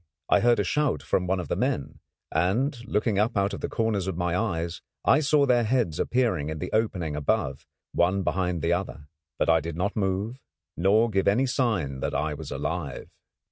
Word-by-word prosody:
I -, -, +5 dB
heard 120 Hz, -1 st, +4 dB
a -, -, +3 dB
shout 115 Hz, -, 0 dB
from 90 Hz, +4 st, 0 dB
one 95 Hz, +1 st, +1 dB
of 90 Hz, -, -5 dB
the -, -, -1 dB
men, 70 Hz, -, -2 dB, 0.3 s
and, 115 Hz, -, +1 dB
looking 105 Hz, -1 st, +1 dB
up 110 Hz, +1 st, +1 dB
out 100 Hz, 0 st, +1 dB
of -, -, -5 dB
the -, -, -2 dB
corners 110 Hz, -4 st, 0 dB
of 95 Hz, -3 st, -3 dB
my 90 Hz, -1 st, 0 dB
eyes, 85 Hz, -5 st, -2 dB, 0.2 s
I -, -, +5 dB
saw 150 Hz, -1 st, +3 dB
their 125 Hz, -3 st, +3 dB
heads 115 Hz, -8 st, 0 dB
appearing 115 Hz, -, +1 dB
in 80 Hz, -, -4 dB
the -, -, -5 dB
opening 90 Hz, -9 st, 0 dB
above, 75 Hz, -1 st, -1 dB, 0.2 s
one 95 Hz, +3 st, +2 dB
behind 90 Hz, -3 st, -1 dB
the 85 Hz, +1 st, +2 dB
other. 85 Hz, -5 st, -4 dB, 0.3 s
But -, -, +1 dB
I 80 Hz, 0 st, +5 dB
did 80 Hz, +1 st, -5 dB
not 95 Hz, +5 st, -1 dB
move 100 Hz, +4 st, -1 dB, 0.4 s
nor 105 Hz, +7 st, +3 dB
give 95 Hz, -1 st, +1 dB
any 110 Hz, +7 st, +4 dB
sign 110 Hz, -, 0 dB
that -, -, -2 dB
I 75 Hz, +1 st, 0 dB
was 75 Hz, -, -7 dB
alive. -, -, -4 dB
95 Hz, 200 wpm, -26 LUFS, 85-115 Hz, 0.4 s, I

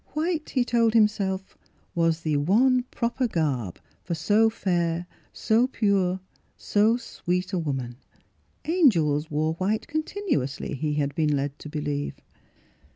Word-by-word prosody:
White, 310 Hz, 0 st, -1 dB
he 255 Hz, -3 st, +1 dB
told 230 Hz, -2 st, +2 dB
himself, 200 Hz, -3 st, +1 dB, 0.4 s
was 165 Hz, -1 st, +1 dB
the 155 Hz, -2 st, 0 dB
one 240 Hz, -, +3 dB
proper 240 Hz, +2 st, -1 dB
garb 140 Hz, -, -1 dB, 0.3 s
for 170 Hz, -, -3 dB
so 210 Hz, +7 st, +3 dB
fair, 175 Hz, -5 st, -1 dB, 0.3 s
so 230 Hz, +3 st, +2 dB
pure, 195 Hz, -6 st, +1 dB, 0.4 s
so 215 Hz, +3 st, +2 dB
sweet 180 Hz, -5 st, -3 dB
a 185 Hz, -, +1 dB
woman. 135 Hz, -6 st, -3 dB, 0.7 s
Angels 165 Hz, -, +3 dB
wore 155 Hz, +1 st, 0 dB
white 195 Hz, +6 st, -1 dB
continuously, 310 Hz, -, -2 dB
he 150 Hz, +2 st, -2 dB
had 145 Hz, -1 st, 0 dB
been 155 Hz, -3 st, +1 dB
led 140 Hz, 0 st, -3 dB
to 150 Hz, -, -9 dB
believe. 145 Hz, -1 st, -3 dB
180 Hz, 130 wpm, -26 LUFS, 150-230 Hz, 0.7 s, one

